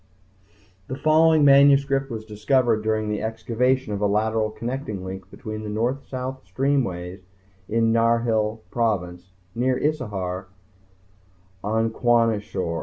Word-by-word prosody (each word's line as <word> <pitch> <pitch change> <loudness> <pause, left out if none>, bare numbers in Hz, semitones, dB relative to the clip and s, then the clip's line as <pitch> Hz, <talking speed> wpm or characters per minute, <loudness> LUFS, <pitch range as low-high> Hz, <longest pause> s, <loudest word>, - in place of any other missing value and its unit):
_ - - -37
The 130 - -5
following 155 +1 +4
manuscript 140 -1 +5
was 110 -2 -6
discovered 110 +2 +1
during 110 0 -1
the 105 -1 -2
excavation 115 +2 0
of 100 - -3
a 105 - +3
lateral 110 +1 +1
connecting 115 -4 -5
link 95 0 -7
between 110 +1 -7
the 105 - -6
North 120 +6 -2
South 130 0 -5
streamways 95 -10 -1 0.5
in 115 0 +2
Narhil 115 -1 +1
Province 95 -6 -2 0.2
near 125 +2 0
Issahar 100 -11 -2 1.2
on 110 +2 0
Kwashior. 110 -8 0
115 Hz, 120 wpm, -23 LUFS, 105-130 Hz, 1.2 s, manuscript